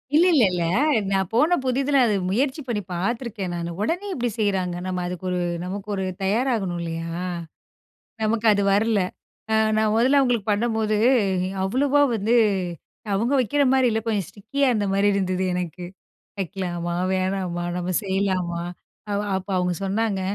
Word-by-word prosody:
இல்லல்லல்ல. 280 - +4 0.5
நான் 190 -2 +1
போன 305 +9 +4
புதிதில 270 +2 +2
அது 215 - +2 0.2
முயற்சி 265 +8 0
பண்ணி 215 -4 -1
பார்த்துருக்கே 215 +2 -2
நானு. 170 0 -3
உடனே 350 - -1
எப்படி 245 -4 -1
செய்றாங்க. 190 -4 0
நம்ம 185 -1 -2
அதுக்கு 180 +1 -6
ஒரு 180 0 -1 0.2
நமக்கு 195 +3 -5
ஒரு 190 - -2 0.2
தயாராகணும் 205 -4 0
இல்லயா? 165 +1 -4 1.0
நமக்கு 220 +1 +1
அது 200 0 +1
வரல. 215 0 +2 0.5
அ - - +2 0.2
நான் 215 -1 +2
மொதல்ல 260 +5 +4
அவங்களுக்கு 240 -6 +1
பண்ணும்போது, 220 0 +1 0.7
அவ்வளோவா 275 +8 +2
வந்து 220 +3 +1 0.8
அவுங்க 230 +8 +1
வக்கிற 270 +5 +1
மாரி 260 -2 +4
இல்ல, 220 - +1
கொஞ்சம் 205 -6 0
ஸ்டிக்கியா 265 +7 -1
இருந்த 210 -3 0
மாரி 200 +1 +3
இருந்தது. 185 -1 0
எனக்கு, 180 0 -4 0.6
வைக்கலாமா? 175 -2 -3 0.2
வேணாமா? 185 -2 -1
நம்ம 180 +1 -2
செய்யலாமா? 185 -3 -1 0.8
அப்ப 190 - -12
அவுங்க 180 -1 0
சொன்னாங்க. 200 0 0
205 Hz, 135 wpm, -23 LUFS, 185-240 Hz, 1.0 s, இல்லல்லல்ல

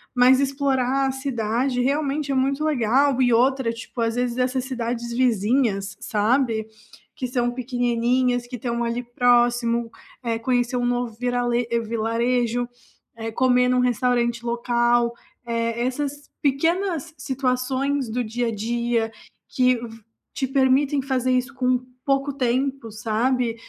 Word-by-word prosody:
mas 250 +1 +6
explorar 270 -1 +1
a - - 0
cidade 250 -1 -1
realmente 285 +1 0
é - - 0
muito 275 +3 +1
legal 270 -1 +2
e 245 -2 +4
outra, 255 0 +2
tipo, 230 +1 -9
às 230 0 0
vezes 245 0 -1
essas 255 0 0
cidades 240 -2 -3
vizinhas, 225 -4 +1
sabe, 225 0 +1 0.5
que 265 -4 -3
são 245 -1 0
pequenininhas, 245 0 0
que 250 - -6
estão 235 0 -2
ali 235 +1 -2
próximo, 240 -1 +2 0.3
eh, 230 -1 -1
conhecer 245 +1 0
um 245 - 0
novo 245 -1 -1
virale 245 -1 0 0.2
vilarejo, 235 +2 0 0.5
eh, 225 0 -4
comer 250 +1 +3
num 250 0 +3
restaurante 240 -1 +1
local, 240 0 +1 0.3
eh, 230 0 -1
essas 285 +2 -3
pequenas 330 +3 0
situações 265 0 -1
do 245 +3 -1
dia 240 +2 -2
a - - 0
dia 230 +1 -1 0.4
que 255 -1 +3
v 230 -1 -9 0.3
te 270 - -1
permitem 270 +1 +2
fazer 255 -1 0
isso 255 +2 0
com 255 -1 +1 0.3
pouco 275 0 +1
tempo, 265 -1 -1
sabe. 230 +3 0
245 Hz, 135 wpm, -23 LUFS, 235-265 Hz, 0.5 s, mas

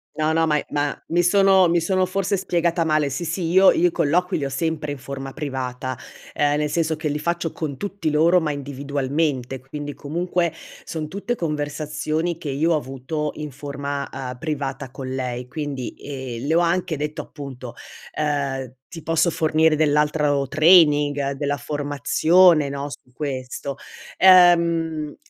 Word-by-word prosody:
No 155 0 +1
no, 165 0 +2
ma 150 -2 +2
è - - -3
ma 145 0 -1
mi 175 +1 +2
sono 190 0 +5
mi 170 0 +2
sono 185 +2 +1
forse 195 +1 -1
spiegata 170 -2 0
male, 155 -2 +2
sì 140 +6 -4
sì, 170 +1 -2
io 190 +2 +6
io 175 - +3
i - - -1
colloqui 180 +6 +1
li 145 - -2
ho - - -2
sempre 150 +2 -2
in 145 - -6
forma 135 0 -7
privata, 130 -3 -4 0.4
ehm, 145 0 +2
nel 150 0 0
senso 160 0 0
che 155 0 -3
li 145 0 -1
faccio 170 +1 -2
con 145 -4 -5
tutti 200 -4 -3
loro 165 +4 +4
ma 155 -3 -1
individualmente, 140 -1 -2
quindi 145 +2 -7
comunque 170 +2 -1 0.3
son 155 -2 -5
tutte 200 +8 -3
conversazioni 155 0 -2
che 165 -3 -6
io 155 +5 +1
ho - - +3
avuto 145 +2 -3
in 150 -1 -5
forma, 140 0 -5
ehm, 125 -1 -6
privata 135 -3 -4
con 130 0 -7
lei. 125 -1 -4
Quindi, 140 -3 -5
ehm, 130 -3 -6
le 155 - +1
ho - - +5
anche 175 -1 0
detto 150 +1 -4
appunto, 130 -5 -9 0.4
ehm: 140 -4 -2 0.2
"Ti 165 - -9
posso 165 +2 +1
fornire 155 0 +2
dell'altro 150 -2 +1
training, 150 -3 +4
della 145 +1 -2
formazione 150 +3 +3
no, 140 +1 -4
su 125 - -12
questo." 135 0 -5 0.4
Ehm, 170 -4 +5
150 Hz, 165 wpm, -22 LUFS, 140-165 Hz, 0.4 s, io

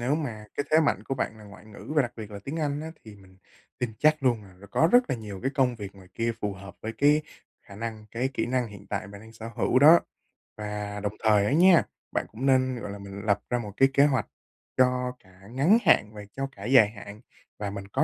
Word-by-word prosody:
nếu 125 +4 +1
mà 120 -9 -4
cái 145 - -1
thế 155 - +6
mạnh 155 - +1
của 135 - -2
bạn 110 -3 -3
là 105 - -13
ngoại 100 +1 -14
ngữ, 105 +5 -10
và 150 - +6
đặc 120 - -4
biệt 110 -2 -8
là 100 - -7
tiếng 140 +4 -4
Anh 145 -1 -1
á, 160 +1 -6
thì 110 -2 -12
mình 95 -1 -19 0.4
tin 125 -2 -2
chắc 155 -1 +3
luôn 120 -5 +2
là 95 -2 -16
nó 100 - -13
có 160 - +3
rất 245 0 +5
là - - 0
nhiều 105 -4 -8
cái 135 - 0
công 130 -4 +2
việc 100 -3 -8
ngoài 95 -2 -16
kia 115 0 0
phù 105 - -1
hợp 100 -1 -11
với 110 - -4
cái 150 +2 +4 0.4
khả 100 - -12
năng, 110 -1 -6
cái 125 +3 -1
kỹ - - -1
năng 125 0 0
hiện 100 -1 -12
tại 100 - -3
bạn 100 0 -11
đang 110 +1 -14
sở 110 0 -8
hữu 130 - +3
đó. 155 +5 +8 0.6
Và 105 -1 -5
đồng 105 0 -3
thời 105 -2 +4
á - - 0
nha, 175 +2 +6 0.3
bạn - - -1
cũng 120 +5 -5
nên, 130 -1 +3
gọi 100 - -5
là, 100 - -7
mình 100 0 -8
lập 100 -2 +2
ra 120 - +1
một 105 -3 -6
cái 135 - +5
kế 140 +1 +6
hoạch 130 -6 +1 0.5
cho 125 0 +2
cả 95 -1 -21
ngắn 145 - +4
hạn 155 - +3
và 105 - -8
cho 135 0 -2
cả - - -9
dài 120 -5 +6
hạn, 105 0 -11 0.4
và 105 -1 -3
mình 100 0 -7
có - - +1
115 Hz, 260 wpm, -27 LUFS, 105-135 Hz, 0.6 s, đó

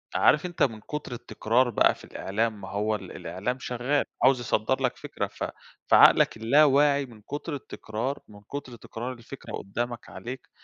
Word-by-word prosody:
عارف 150 +4 +4
أنت 175 -1 0
من 115 -5 +1
كتر 150 -3 -6
التكرار 120 +1 +1
بقى 115 - +4
في - - -16
الإعلام، 110 +1 -2
ما 95 - -7
هو 105 +2 0
ال 95 -3 -8
الإعلام 125 +8 -3
شغال، 125 +4 0 0.2
عاوز 130 0 +6
يصدر 120 +2 0
لك 125 - 0
فكرة، - - -4
ف - - -7 0.4
فعقلك - - +6
اللاواعي 140 +3 +4
من 115 -4 -15
كتر 145 +6 -5
التكرار، 125 0 -4
من 105 -1 -14
كتر 130 +3 -7
تكرار 120 +2 -6
الفكرة 125 +2 -10
قدامك 120 +4 -4
عليك 125 +2 -8
120 Hz, 165 wpm, -27 LUFS, 110-135 Hz, 0.4 s, عاوز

